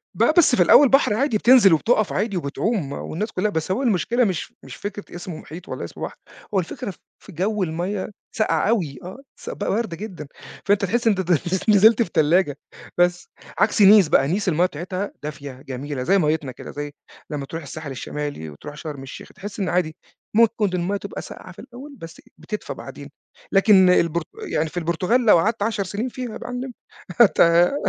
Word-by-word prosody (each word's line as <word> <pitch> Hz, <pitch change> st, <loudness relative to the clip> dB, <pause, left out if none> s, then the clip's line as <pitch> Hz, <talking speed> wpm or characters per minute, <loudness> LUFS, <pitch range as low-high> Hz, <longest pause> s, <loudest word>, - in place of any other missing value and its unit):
بقى -, -, +3 dB
بس 305 Hz, -6 st, +6 dB
في -, -, +5 dB
الأول 285 Hz, -2 st, +7 dB
بحر 270 Hz, -5 st, +4 dB
عادي 230 Hz, 0 st, +1 dB
بتنزل 235 Hz, -6 st, +6 dB
وبتقف 215 Hz, +6 st, +2 dB
عادي 200 Hz, -1 st, -1 dB
وبتعوم، 165 Hz, -, -2 dB
والناس 210 Hz, +9 st, -4 dB
كلّها 205 Hz, +3 st, 0 dB
بس 160 Hz, 0 st, -2 dB
هو 245 Hz, +8 st, -1 dB
المشكلة 235 Hz, +2 st, +1 dB
مش 185 Hz, -8 st, -2 dB
مش 135 Hz, -, -10 dB
فكرة 205 Hz, -2 st, -7 dB
اسمه 175 Hz, -2 st, -7 dB
محيط 170 Hz, +5 st, -11 dB
والّا -, -, -5 dB
اسمه -, -, -9 dB
بحر، -, -, -5 dB, 0.4 s
هو 195 Hz, -, +3 dB
الفكرة 200 Hz, +4 st, -5 dB, 0.3 s
في -, -, -14 dB
جو 195 Hz, +4 st, -1 dB
المَيَّة 180 Hz, +4 st, -3 dB, 0.3 s
ساقعة 215 Hz, -1 st, +1 dB
أوي، 165 Hz, -, -1 dB
آه، 185 Hz, +6 st, -8 dB, 0.2 s
س -, -, -8 dB
ب -, -, -6 dB
باردة 205 Hz, -5 st, -2 dB
جدًا، 180 Hz, -7 st, -8 dB, 0.4 s
فأنت 205 Hz, 0 st, +2 dB
تحس 235 Hz, +4 st, 0 dB
إن 215 Hz, -, +4 dB
أنت 185 Hz, -1 st, -1 dB
نز 175 Hz, +3 st, +1 dB
نزلت 215 Hz, +3 st, +6 dB
في 225 Hz, -, 0 dB
تلاجة، 155 Hz, -1 st, +2 dB, 0.4 s
بس. 175 Hz, 0 st, +1 dB, 0.3 s
عكس -, -, +2 dB
Nice 200 Hz, -4 st, +7 dB
بقى، 135 Hz, -, +4 dB
Nice 195 Hz, +7 st, -1 dB
المَيَّة 175 Hz, 0 st, +3 dB
بتاعتها 185 Hz, +4 st, -4 dB
دافية، 140 Hz, -3 st, -7 dB
جميلة، 135 Hz, 0 st, -5 dB
زي 195 Hz, +9 st, +3 dB
ميِّتنا 150 Hz, -5 st, 0 dB
كده، -, -, -10 dB
زي 145 Hz, 0 st, -6 dB, 0.4 s
لمّا 145 Hz, -2 st, -4 dB
تروح 165 Hz, +4 st, -7 dB
الساحل 145 Hz, +1 st, -7 dB
الشمالي 145 Hz, -, -5 dB
وتروح 110 Hz, -, -10 dB
شرم 150 Hz, -3 st, -7 dB
الشيخ، 135 Hz, -, -10 dB
تحس 205 Hz, +2 st, -8 dB
إن 190 Hz, -2 st, -1 dB
عادي، 175 Hz, -3 st, 0 dB, 0.4 s
ممكن 225 Hz, -1 st, +3 dB
المَيَّة 180 Hz, +3 st, -1 dB
تبقى 200 Hz, 0 st, -7 dB
ساقعة 185 Hz, -, -11 dB
في 175 Hz, -, -15 dB
الأول، 270 Hz, +4 st, -11 dB
بس 165 Hz, -5 st, -11 dB, 0.2 s
بتدفى 210 Hz, +7 st, -6 dB
بعدين. -, -, -10 dB, 0.4 s
لكن 195 Hz, -2 st, +5 dB
البرت 170 Hz, -2 st, +2 dB, 0.2 s
يعني 155 Hz, +1 st, 0 dB
في 175 Hz, -, -10 dB
البرتغال 180 Hz, +9 st, 0 dB
لو 210 Hz, -, +7 dB
قعدت 210 Hz, +4 st, 0 dB
10 210 Hz, -2 st, -1 dB
سنين 205 Hz, +6 st, -4 dB
فيها 250 Hz, -2 st, -6 dB
يا -, -, -6 dB
معلم 250 Hz, +1 st, -5 dB, 0.5 s
هت 225 Hz, -, +5 dB
هت 170 Hz, +6 st, +5 dB
185 Hz, 190 wpm, -22 LUFS, 160-215 Hz, 0.5 s, الأول